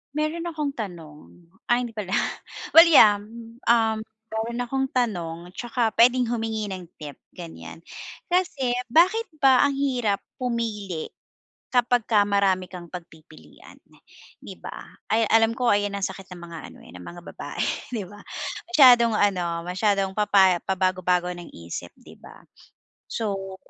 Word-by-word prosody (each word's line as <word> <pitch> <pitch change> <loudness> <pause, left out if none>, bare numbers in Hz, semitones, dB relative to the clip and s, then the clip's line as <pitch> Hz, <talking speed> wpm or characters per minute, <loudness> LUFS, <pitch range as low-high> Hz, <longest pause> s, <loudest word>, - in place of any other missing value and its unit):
Mayro'n 310 +2 -1
akong 300 -3 -3
tanong, 170 -4 -9 0.2
ay 245 0 +2
hindi 225 - -14
pala 200 -3 -5 0.6
well 330 - +12
yeah, 220 -10 +7
hmm, 225 +3 -11
um, 225 -2 +3 0.3
mayro'n 225 +2 -4
akong 265 +2 -1
tanong 180 -7 -3
'tsaka 240 -2 -1
puwedeng 245 +1 +4
humingi 225 -2 -2
ng 190 -2 -6 0.2
tip, 145 -2 -8 0.2
ganyan. 170 -2 -10 0.5
Kasi 320 -9 0 0.2
bakit 370 - +4 0.2
ba 265 -2 +5
ang 285 - +3
hirap 250 -7 0 0.2
pumili 220 -8 -3 0.6
kapagka 240 -4 +3
marami 195 -2 +1
kang 175 -2 -10
pagpipilian 160 - -13 0.6
'di - - -9
ba, - - -8 0.3
ay 225 +1 +3
alam 225 0 +4
ko 245 -1 +1
ayan 205 0 +1
ang 200 - -4
sakit 190 0 -10
ng 175 - -11
mga 170 -1 -9
ano, - - -15
eh, - - -15
ng 90 - -10
mga 175 0 -9
babae - - -5 0.3
'di 210 - -3
ba, 205 +2 -13 0.5
masyadong 245 -7 +7
ano 175 -5 0
masyadong 195 +1 0
papa 195 -4 +4
pabago-bago 180 -1 0
ng 175 -1 -10
isip 85 0 -7
'di - - -15
ba? - - -15 0.7
So 195 -4 -4
210 Hz, 140 wpm, -24 LUFS, 185-245 Hz, 0.7 s, well